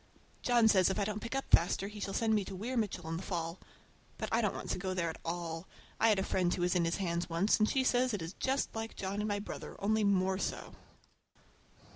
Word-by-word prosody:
John 240 -2 +4
says 190 -4 +5
if 190 - -1
I 200 - +1
don't 210 0 -2
pick 230 +3 -4
up 270 - -1
faster 180 +3 +4
he 210 +1 -8
shall 195 -1 -3
send 225 -1 +2
me 210 -2 +2
to 195 - -6
Weir 230 +7 -4
Mitchell 200 -7 -1
in 165 0 -2
the - - -5
fall. 170 -2 -3 0.6
But - - -3
I 230 - +3
don't 210 -3 0
want - - -4
to - - -1
go 185 0 -2
there 170 -3 0
at - - -13
all. 165 0 -4 0.3
I 225 - +5
had 210 - +4
a 190 - +1
friend 180 -2 +1
who 175 - -1
was 180 - +2
in 175 -2 +2
his 165 - 0
hands 175 -3 -1
once, 170 +7 +2
and 215 - +4
she 265 - +2
says 255 0 +3
he 215 - -1
is 165 0 -6
just 265 +6 -1
like 225 0 -4
John 195 +1 -3
and 210 - -1
my 205 -1 0
brother, 205 - -7
only 215 +2 +2
more 190 -1 +2
so! - - -3
195 Hz, 255 wpm, -33 LUFS, 175-220 Hz, 0.6 s, says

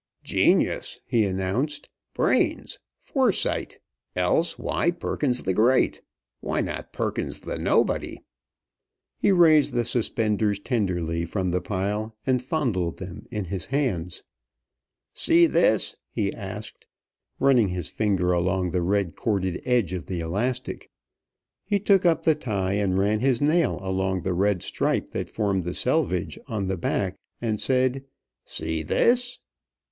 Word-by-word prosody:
"Genius!" - - +1
he 115 -4 +2
announced. 100 +10 -2 0.3
"Brains! - - +1 0.2
Foresight! - - 0 0.4
Else 90 - +1
why - - 0
Perkins 145 -7 -1
the 95 - 0
Great? 120 +7 +3 0.4
Why - - -2
not - - -4
Perkins - - -3
the - - -5
Nobody?" - - +1 1.0
He - - +3
raised 155 -6 +5
the 120 -1 +1
suspenders 105 -3 0
tenderly 90 -8 -1
from 90 +1 -2
the 90 +1 0
pile, 105 +3 -2
and 130 -2 +2
fondled 120 - -1
them 95 -2 -9
in 105 -5 -3
his 90 -1 -5
hands. 120 - -2 0.9
"See 340 +1 +4
this?" - - +2
he - - -1
asked, 470 -2 -8 0.5
running 130 -6 +4
his 90 -3 -4
finger 95 -4 0
along 90 +1 0
the 90 +1 0
red 95 -1 0
corded 95 -5 -1
edge 120 -8 +1
of 90 -2 -5
the 90 -2 -3
elastic. 115 +10 -3 0.7
He 205 0 0
took 195 -2 +4
up 165 - +2
the 160 - +5
tie, 100 -10 -2
and 100 -2 +1
ran 105 +2 +2
his 130 0 +2
nail 155 0 +2
along 95 -1 -1
the 95 - -1
red 95 0 +1
stripe - - -1
that - - -4
formed 100 -4 0
the 90 +1 -3
selvedge 95 - 0
on 110 -6 -2
the 95 0 -2
back, 95 +2 -1 0.2
and 110 -3 -2
said, 130 0 +2 0.4
"See 80 -1 -3
this?" 245 - +2
105 Hz, 135 wpm, -25 LUFS, 95-130 Hz, 1.0 s, raised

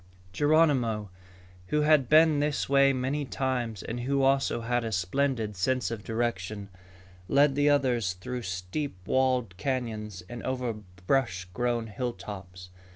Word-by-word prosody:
Geronimo, 130 - +2 0.6
who 150 +7 +1
had 150 -4 +4
been 155 -1 +6
this 145 0 0
way 140 0 +5
many 135 +3 -1
times 125 -6 -2
and 120 +2 -4
who 135 +3 0
also 135 -3 +2
had 120 +1 0
a 115 - -3
splendid 110 +3 0
sense 125 +6 0
of 110 -3 -5
direction, 105 -3 -3 0.6
led 140 0 +4
the 145 +1 +3
others 125 -9 +2
through 120 +8 -5
steep 95 +8 -4
walled 130 -6 +1
canyons 105 -5 -3
and 120 0 -7
over 125 -2 -2 0.3
brush 95 -8 +1
grown 120 0 0
hilltops. 100 -6 -6
120 Hz, 135 wpm, -28 LUFS, 105-135 Hz, 0.6 s, been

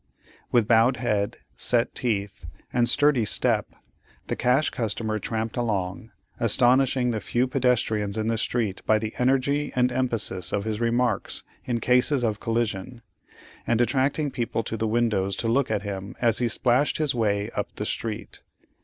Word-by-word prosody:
With 115 -3 +3
bowed 115 +2 +4
head, 105 -4 -1 0.2
set 120 -1 +1
teeth, 100 -7 -3 0.3
and 120 -1 +3
sturdy 145 -3 +3
step, 105 - +1 0.5
the - - 0
cash 125 +5 +2
customer 110 -1 -2
tramped 110 +1 -3
along, 110 -1 -2 0.3
astonishing 125 +2 +3
the 110 - -2
few 120 +2 0
pedestrians 120 -5 0
in 110 - -1
the 115 +1 +1
street 110 -5 -1
by 110 - +5
the 110 0 -4
energy 135 +3 +1
and 125 0 +2
emphasis 115 -8 -1
of 100 - -1
his 110 0 -3
remarks 120 -2 0 0.2
in 120 -2 -1
cases 125 +3 +2
of 110 -3 0
collision, 115 0 -2 0.6
and 115 - +2
attracting 135 +5 +1
people 115 -2 -2
to 110 - -4
the 110 0 -1
windows 110 -4 +1
to 115 - -2
look 135 +4 +1
at 100 - -1
him 100 +2 -6
as 115 -2 +2
he 120 - +1
splashed 125 +4 +1
his 155 -3 0
way 105 -2 0
up 105 - -3
the 105 - -4
street. 110 0 -4
115 Hz, 160 wpm, -25 LUFS, 110-125 Hz, 0.6 s, by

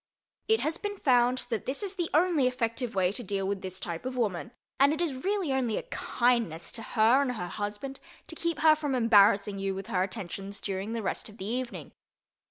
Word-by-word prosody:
It 445 0 +3
has 320 +2 0
been 410 -1 -4
found 250 -4 +3
that 225 - -2
this 275 +10 0
is 395 -1 -1
the 350 -4 -2
only 315 -4 +3
effective 235 -2 -2
way 185 -1 +3
to 230 - -5
deal 195 -1 -2
with 200 -1 -2
this 185 0 -6
type 170 -2 -5
of 255 0 -4
woman 215 -3 -1 0.3
and 280 +1 +6
it 310 - -2
is 280 -7 -2
really 385 -7 0
only 250 -4 0
a - - -3
kindness 235 - 0
to 230 - -6
her 230 +4 +4
and 260 -3 0
her 180 -7 -4
husband 210 +8 -4 0.3
to - - -9
keep 335 -1 -2
her 315 0 +7
from 295 -3 -2
embarrassing 205 -4 +4
you 195 0 -1
with 195 0 -5
her 180 - +2
attentions 195 +1 -4
during 195 +2 -3
the 230 -2 -3
rest 195 - -3
of 210 - -14
the 190 - -6
evening. 245 +3 -4
235 Hz, 215 wpm, -29 LUFS, 200-275 Hz, 0.3 s, her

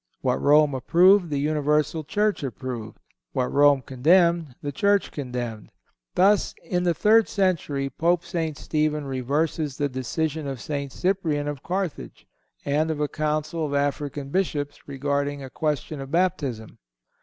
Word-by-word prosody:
What - - 0
Rome 150 0 +5
approved, 175 +7 +4
the 145 - -1
universal 150 +2 +1
Church 210 +7 0
approved; 120 -3 -5 0.4
what 125 -1 -1
Rome 145 -2 +5
condemned, 165 +1 +3
the 145 - -2
Church 200 +7 +2
condemned. 125 -5 -5 0.5
Thus, 200 +2 +3
in 180 -1 -1
the 175 -2 +1
third 220 +3 +4
century, 165 -8 0
Pope 170 +5 0
St. 165 -4 -3
Stephen 150 -1 -1
reverses 140 +2 -1
the 145 -1 0
decision 145 +4 -2
of 135 -2 -4
St. 140 +1 -4
Cyprian, 165 -5 -1
of 145 -2 -4
Carthage, 185 -1 -4 0.4
and 150 +3 +1
of 155 -2 -2
a 150 - +1
council 155 +2 -2
of 145 -2 -2
African 140 0 -2
bishops 145 -5 -2
regarding 140 0 -2
a 130 - -9
question 150 -1 -2
of 135 - -7
baptism. 150 -10 -1
150 Hz, 145 wpm, -25 LUFS, 140-170 Hz, 0.5 s, Rome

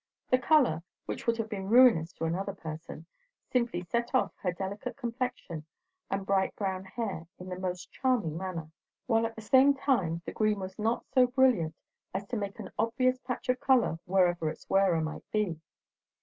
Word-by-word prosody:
The 255 - +5
colour, 255 - +4 0.2
which - - -5
would 230 0 +3
have 225 -1 -2
been 195 -3 -5
ruinous 225 -9 +6
to - - -7
another 185 +4 -1
person, 160 -2 -8 0.5
simply 235 -8 0
set 235 +8 -1
off 255 - +2
her 180 - 0
delicate 200 +7 -5
complexion 240 - -4 0.5
and 195 0 -2
bright 195 -1 +1
brown 190 -2 -2
hair 190 -5 -4
in 180 +1 -9
the 180 0 -5
most 180 -1 -4
charming 245 - 0
manner; 170 -3 -5 0.3
while 230 -1 +2
at 225 - -11
the 220 - -9
same 265 +5 +6
time 185 - 0
the - - -4
green 215 -1 +1
was 190 +1 -7
not 225 +2 0
so 255 -1 +6
brilliant 245 - +3 0.4
as 200 +1 -2
to 245 - -2
make 200 -2 -3
an 195 - -7
obvious 255 +3 +2
patch 250 -1 -5
of 250 0 +2
colour 245 -12 +3
wherever 175 -3 +2
its - - -9
wearer 195 -4 +3
might 155 0 -5
be. 200 -7 0
200 Hz, 180 wpm, -30 LUFS, 180-245 Hz, 0.5 s, ruinous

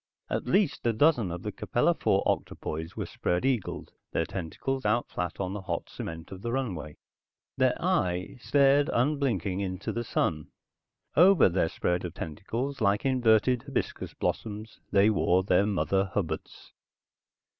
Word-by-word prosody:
At - - -2
least 195 - +2
a 115 - +3
dozen 120 - +3
of 85 0 -6
the - - -3
Capella - - +1
IV - - +1
octopoids 80 +2 -3
were - - -3
spread 90 +7 -1
eagled, 125 -8 -1 0.2
their 80 - +1
tentacles 100 +11 -4
out 110 +3 +1
flat 90 -1 -4
on 95 -1 -2
the 105 - -5
hot 90 -3 -4
cement 80 +1 -7
of 95 -1 -8
the 115 +2 -3
runway. 90 - -3 0.6
Their - - +3
eye 90 +6 0
stared 140 +2 +4
unblinking 120 - 0
into 95 -1 -3
the 120 - -2
sun. 75 -8 -1 0.7
Over 180 - +7
their 85 -2 +1
spread 90 +1 -1
of 90 -2 -6
tentacles, 115 - -4
like 100 +1 +2
inverted 125 -1 +3
hibiscus - - -3
blossoms, 110 0 -3
they 100 +2 +4
wore 95 -2 +2
their 95 +2 +3
mother 95 -1 +1
hubbards. 95 - -5
100 Hz, 150 wpm, -28 LUFS, 90-125 Hz, 0.7 s, Over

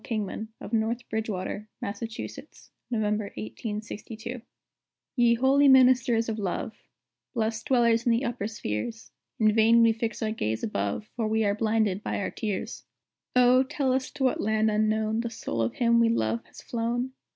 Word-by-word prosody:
Kingman, 215 -1 -3
of 220 - -9
North 230 +2 0
Bridgewater, 215 -1 -3
Mass., 200 0 -5 0.9
November, 215 -3 0
1862.] 215 - -6 0.7
Ye 240 -2 +4
holy 270 +4 +4
ministers 250 -3 +5
of 220 -1 -3
Love, 210 +4 -3 0.6
Blest 220 -1 -1
dwellers 235 -2 +3
in - - +5
the 230 +4 +1
upper 235 -4 -2
spheres, 220 - -5 0.3
In 215 -1 +4
vain 230 +1 +5
we 225 -1 +5
fix 225 0 -3
our 215 - 0
gaze 110 - -2
above, 100 - -2
For 230 -3 -1
we 220 +1 +1
are 200 -1 +2
blinded 215 -2 +1
by - - -2
our 200 - -2
tears. 220 +2 -4 0.5
O, 250 +1 +6
tell 270 -1 0
us 260 0 -1
to 285 -2 -3
what 260 - +2
land 220 0 +2
unknown 215 +1 +1
The 235 0 -2
soul 115 - -4
of 115 +1 -1
him 235 -1 +3
we 230 0 +4
love 115 - 0
has - - -14
flown? 240 +2 -2
225 Hz, 160 wpm, -27 LUFS, 215-240 Hz, 0.9 s, O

